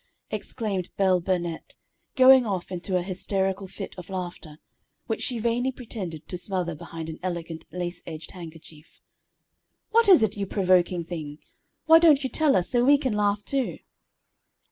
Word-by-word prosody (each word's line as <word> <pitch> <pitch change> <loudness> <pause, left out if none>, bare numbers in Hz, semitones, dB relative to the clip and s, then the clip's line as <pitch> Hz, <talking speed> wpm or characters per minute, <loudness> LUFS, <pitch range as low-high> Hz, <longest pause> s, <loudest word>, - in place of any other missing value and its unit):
exclaimed 195 -6 -3
Belle 185 -2 +3
Burnette, 175 -2 -3 0.4
going 260 -1 +8
off 195 -5 -3
into 185 +1 -1
a 180 - -1
hysterical 190 +1 -1
fit 195 +1 -8
of 180 - -11
laughter, 175 -4 -6 0.5
which 225 - -3
she 245 - 0
vainly 235 +3 0
pretended 195 - -7
to 180 - -3
smother 180 -3 -1
behind 160 +1 -8
an 160 0 -7
elegant 170 -3 -5
lace 175 -1 -4
edged 160 -1 -7
handkerchief. 165 -3 -12 0.9
"What 455 -1 +4
is 350 - +8
it, 215 -1 0
you 200 -1 -3
provoking 180 -3 +2
thing! 155 -4 -6 0.5
Why 325 0 +8
don't 305 -4 +5
you 265 - -3
tell 310 -3 +3
us, 180 -2 0
so 240 -1 +3
we 285 +3 +6
can 265 -5 -2
laugh 205 0 0
too?" 270 -2 -1
190 Hz, 160 wpm, -25 LUFS, 175-230 Hz, 0.9 s, going